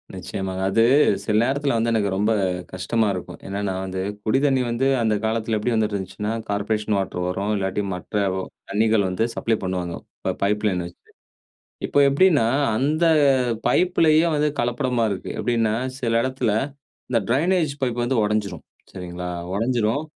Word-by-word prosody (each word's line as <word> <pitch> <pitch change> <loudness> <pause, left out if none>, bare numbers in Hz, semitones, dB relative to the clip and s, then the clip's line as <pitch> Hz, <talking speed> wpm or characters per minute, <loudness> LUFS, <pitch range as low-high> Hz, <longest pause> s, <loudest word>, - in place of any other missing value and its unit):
நிச்சயமாங்க. 95 -1 -4
அது 115 +3 +4 0.4
சில 105 - 0
நேரத்துல 140 +1 0
வந்து 115 +1 +1
எனக்கு 105 -3 +1
ரொம்ப 105 +3 +1
நேரம் 90 -2 -1
கஷ்டமா 110 +4 0
இருக்கும். 90 - -7
என்னன்னா 100 0 -2
வந்து 95 0 -4 0.2
குடி 110 +4 +3
தண்ணீ 135 -2 +3
வந்து 120 +3 +1
அந்த 110 -2 +2
காலத்துல 110 0 0
எப்படி 115 +3 -1
வந்துட்டு 110 -2 0
இருந்துச்சுன்னா 100 +2 -4 0.2
கார்ப்பரேஷன் 105 +1 -1
வாட்டர் 95 -2 -2
வரும். 95 +3 -2
இல்லாட்டி 95 +1 -1
மற்ற 90 +4 -9 0.6
தண்ணீர்கள் 110 -1 +2
வந்து 90 +5 0
சப்ளை 115 -1 0
பண்ணுவாங்க 90 -2 -2 0.5
பைப்லைன் 100 -3 +1
வச்சு. 85 - -11 0.9
இப்போ - - 0
எப்படின்னா 145 -3 +4 0.3
அந்த 150 +7 +1 0.6
பைப்புலேயே 165 0 +3
வந்து 150 0 +2
கலப்படமா 120 0 0
இருக்கு 95 -2 -5
எப்படின்னா 115 -3 +1 0.3
சில 115 -2 0
இடத்துல 130 -3 -1 0.6
இந்த 120 - +3
ட்ரெயினேஜ் 160 +4 +2
பைப் 120 -2 -1
வந்து 130 +2 0
உடைஞ்சிடும் 105 -1 -2 0.3
சரிங்களா, 90 -1 -6 0.3
உடைஞ்சிடும் 115 +4 0
110 Hz, 145 wpm, -23 LUFS, 100-125 Hz, 0.9 s, அது